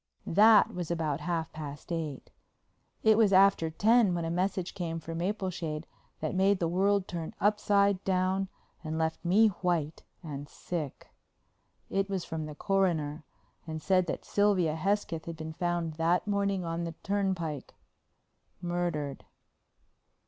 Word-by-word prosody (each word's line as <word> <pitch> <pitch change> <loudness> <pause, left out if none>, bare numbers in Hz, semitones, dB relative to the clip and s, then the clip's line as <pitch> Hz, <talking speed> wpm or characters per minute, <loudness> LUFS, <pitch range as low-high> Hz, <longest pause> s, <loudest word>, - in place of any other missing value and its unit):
That 210 +3 +6
was 175 -2 -4
about 160 -4 -1
half 165 0 -2
past 150 +1 -8
eight. 155 -5 -4 0.7
It 220 0 +5
was 215 -3 +5
after 190 -4 +5
ten 210 +3 +4
when 170 -1 -2
a 165 - -2
message 185 +1 -1
came 165 -2 -3
for 165 +1 -7
Mapleshade 170 -3 -3 0.4
that 155 - -2
made 195 +2 +3
the 170 - 0
world 195 +3 +2
turn 165 -2 -5
upside 200 -1 +2
down 190 0 +1 0.3
and 160 0 -3
left 160 +2 -1
me 205 +6 +5
white 175 -5 -1 0.2
and 145 -2 -6
sick. 160 -6 -5 0.8
It 195 0 0
was 190 -3 -2
from 160 -1 -4
the 150 - -8
Coroner 160 -6 0 0.4
and 160 0 -4
said 185 +2 +2
that - - -4
Sylvia 190 -6 +2
Hesketh 180 -2 -1
had 170 - -5
been 160 0 -6
found 175 -1 -1
that 170 +4 +2
morning 200 -3 0
on 165 +1 -2
the 165 -1 -5
turnpike, 190 -8 -2 0.8
murdered. 175 -5 -2
175 Hz, 140 wpm, -30 LUFS, 160-195 Hz, 0.8 s, That